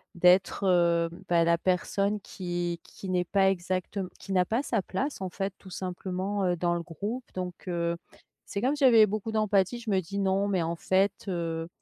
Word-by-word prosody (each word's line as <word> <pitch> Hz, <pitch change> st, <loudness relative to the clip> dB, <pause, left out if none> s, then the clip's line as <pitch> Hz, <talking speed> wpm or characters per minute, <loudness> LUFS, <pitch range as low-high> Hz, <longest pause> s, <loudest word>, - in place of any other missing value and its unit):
d'être, 180 Hz, +3 st, +4 dB
heu, 170 Hz, -2 st, +3 dB, 0.2 s
bah, 170 Hz, -1 st, +4 dB
la 170 Hz, 0 st, +4 dB
personne 195 Hz, +3 st, 0 dB
qui 175 Hz, -3 st, -4 dB
qui 195 Hz, -, -10 dB
n'est 180 Hz, -1 st, +2 dB
pas 195 Hz, +1 st, +3 dB
exactem 185 Hz, +1 st, -2 dB
qui 195 Hz, -, -5 dB
n'a 185 Hz, -1 st, +4 dB
pas 230 Hz, +6 st, 0 dB
sa 225 Hz, -7 st, 0 dB
place 255 Hz, +6 st, -3 dB
en 185 Hz, -, -2 dB
fait 195 Hz, +1 st, -3 dB
tout 190 Hz, -, -14 dB
simplement, 185 Hz, +2 st, -3 dB
heu, 175 Hz, -1 st, +1 dB
dans 175 Hz, 0 st, +1 dB
le 170 Hz, -, -2 dB
groupe. 205 Hz, +10 st, -4 dB
Donc, 180 Hz, 0 st, -6 dB
heu, 170 Hz, -1 st, 0 dB, 0.5 s
c'est 200 Hz, -, -4 dB
comme 270 Hz, +5 st, +2 dB
si 290 Hz, -, -2 dB
j'avais 230 Hz, -4 st, +8 dB
beaucoup 215 Hz, +2 st, -3 dB
d'empathie, 215 Hz, +1 st, +2 dB
je 235 Hz, -, -6 dB
me 190 Hz, -2 st, +2 dB
dis: 200 Hz, +4 st, -5 dB
«Non 195 Hz, +1 st, +2 dB
mais 185 Hz, -4 st, +1 dB
en 170 Hz, +1 st, -2 dB
fait, 190 Hz, +3 st, +2 dB, 0.2 s
heu, 165 Hz, -2 st, -2 dB
185 Hz, 200 wpm, -28 LUFS, 175-200 Hz, 0.5 s, j'avais